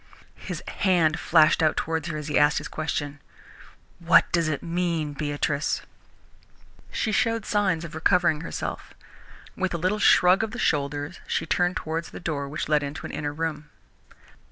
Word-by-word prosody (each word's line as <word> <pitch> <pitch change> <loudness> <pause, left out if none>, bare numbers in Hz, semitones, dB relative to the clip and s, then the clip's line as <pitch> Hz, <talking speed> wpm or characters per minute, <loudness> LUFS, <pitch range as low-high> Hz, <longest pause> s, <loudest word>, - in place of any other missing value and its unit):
His - - -6
hand 175 -4 +2
flashed 160 -2 +4
out 155 -1 +2
towards 160 0 -2
her 160 -3 -3
as 150 -1 -6
he 150 - -2
asked 145 0 +4
his - - -3
question. 145 -2 -3 0.8
"What 170 +1 +4
does 170 -2 +2
it 155 -2 -2
mean, 170 -3 -1
Beatrice?" 145 0 -1 1.1
She 220 - -1
showed 225 +1 +1
signs 190 -6 0
of 165 - -9
recovering 160 -1 +2
herself. 165 - -6 0.6
With 190 -2 -1
a - - 0
little 185 +5 0
shrug 180 -2 +5
of 220 -1 -4
the - - -5
shoulders 145 -1 -1
she 160 - -1
turned 175 +2 +1
towards 160 +1 -4
the - - -9
door 145 -5 -3
which 150 - -4
led 150 0 +3
into 145 +1 -6
an - - -6
inner 145 -1 -3
room. 155 -1 -4
160 Hz, 165 wpm, -25 LUFS, 150-180 Hz, 1.1 s, shrug